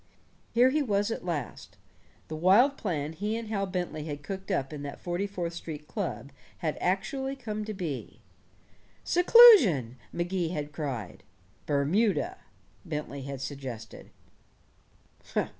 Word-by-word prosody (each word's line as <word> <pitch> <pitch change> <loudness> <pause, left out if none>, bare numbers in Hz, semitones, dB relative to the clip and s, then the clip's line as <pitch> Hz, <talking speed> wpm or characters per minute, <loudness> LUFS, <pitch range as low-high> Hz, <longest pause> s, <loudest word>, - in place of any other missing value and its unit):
Here 245 +2 +5
he 305 +2 +2
was 205 -4 +1
at - - -4
last. 155 -9 -5 0.5
The 155 - -5
wild 200 - +5
plan 160 - -3
he 210 +6 -2
and 230 -2 -6
Hal 200 -2 -1
Bentley 175 -5 -3
had 145 -2 -6
cooked 190 +4 -6
up 155 -7 -1
in 145 - -6
that 145 0 -7
Forty 175 +3 -2
fourth 175 -4 -4
Street 155 -3 -7
club 160 - -4 0.3
had 155 -2 -2
actually 265 +9 -1
come 215 -5 -4
to 215 - -4
be. 150 - -5 0.8
"Seclusion," 340 - +7
Magee 175 0 -1
had 150 -3 -4
cried. 135 - -5 0.5
"Bermuda," 200 - +1 0.4
Bentley 150 -5 -5
had 135 -1 -6
suggested. 130 -5 -7
175 Hz, 130 wpm, -29 LUFS, 145-210 Hz, 0.8 s, Seclusion